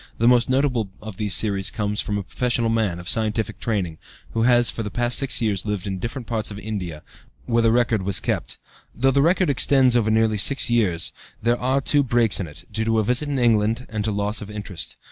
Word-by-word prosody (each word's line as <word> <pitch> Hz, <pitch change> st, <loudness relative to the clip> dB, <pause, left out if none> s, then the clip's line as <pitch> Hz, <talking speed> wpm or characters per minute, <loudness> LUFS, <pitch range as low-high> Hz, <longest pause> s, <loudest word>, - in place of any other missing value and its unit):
The 115 Hz, -, +2 dB
most 120 Hz, -1 st, +4 dB
notable 130 Hz, -5 st, +1 dB
of 105 Hz, -3 st, -9 dB
these 105 Hz, -2 st, 0 dB
series 100 Hz, -3 st, 0 dB
comes 105 Hz, -1 st, -2 dB
from 105 Hz, -, -3 dB
a 100 Hz, -, -3 dB
professional 120 Hz, +2 st, -1 dB
man, 110 Hz, -6 st, 0 dB
of 90 Hz, 0 st, -10 dB
scientific 110 Hz, 0 st, 0 dB
training, 95 Hz, -8 st, -2 dB, 0.3 s
who 115 Hz, -, -1 dB
has 120 Hz, -1 st, +4 dB
for -, -, -5 dB
the 105 Hz, -, -4 dB
past 120 Hz, +4 st, 0 dB
six 135 Hz, -3 st, +1 dB
years 100 Hz, -5 st, 0 dB
lived 105 Hz, -3 st, -3 dB
in 95 Hz, -2 st, -4 dB
different 120 Hz, +5 st, -5 dB
parts 110 Hz, -2 st, -2 dB
of 100 Hz, -, -7 dB
India, 95 Hz, -7 st, -6 dB, 0.4 s
where 115 Hz, -1 st, +1 dB
the 115 Hz, -1 st, +3 dB
record 120 Hz, -3 st, +2 dB
was 95 Hz, -1 st, +2 dB
kept. -, -, -3 dB, 0.4 s
Though 135 Hz, +3 st, +2 dB
the 140 Hz, +1 st, +2 dB
record 175 Hz, +1 st, +2 dB
extends 130 Hz, -2 st, +3 dB
over 115 Hz, -3 st, +2 dB
nearly 110 Hz, -1 st, +2 dB
six 135 Hz, +2 st, +4 dB
years, 95 Hz, -8 st, +1 dB, 0.3 s
there 120 Hz, +2 st, 0 dB
are 130 Hz, +2 st, +1 dB
two 145 Hz, +2 st, +3 dB
breaks 120 Hz, -5 st, +2 dB
in 90 Hz, -, -3 dB
it, 80 Hz, +4 st, -12 dB
due 110 Hz, -, -1 dB
to 115 Hz, 0 st, +1 dB
a 110 Hz, -, +2 dB
visit 125 Hz, +7 st, 0 dB
to 145 Hz, -, -2 dB
England, 115 Hz, +1 st, +2 dB
and 110 Hz, -1 st, -3 dB
to 110 Hz, -, -1 dB
loss 105 Hz, +1 st, -2 dB
of 105 Hz, -, -8 dB
interest. 100 Hz, -5 st, -4 dB
110 Hz, 225 wpm, -22 LUFS, 105-120 Hz, 0.4 s, most